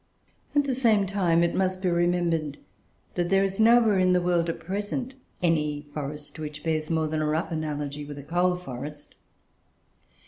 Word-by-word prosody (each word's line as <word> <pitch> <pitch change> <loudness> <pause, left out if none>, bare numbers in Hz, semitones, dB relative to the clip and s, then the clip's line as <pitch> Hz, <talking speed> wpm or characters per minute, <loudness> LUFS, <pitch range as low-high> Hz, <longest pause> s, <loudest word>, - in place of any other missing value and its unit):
At 290 - +5
the 275 -2 -1
same 225 -5 +3
time, 180 -4 +2
it 170 - +1
must 185 0 0
be - - +2
remembered, 170 -4 +1 0.6
that 175 -1 -1
there 195 +1 +4
is 195 +1 -2
nowhere 225 -3 +5
in 185 0 +4
the 180 - +4
world, 175 -1 +1
at 165 - -3
present, 205 +8 -3 0.3
any 150 -3 +1
forest 145 +1 -6
which 150 -1 -6
bears 155 -2 -1
more 160 -1 +1
than 155 0 -1
a 155 - 0
rough 160 +4 -1
analogy 150 -2 -3
with 145 0 -8
a 140 - -8
coal 175 +4 +1
forest. 145 -3 -8
170 Hz, 175 wpm, -26 LUFS, 150-190 Hz, 0.6 s, At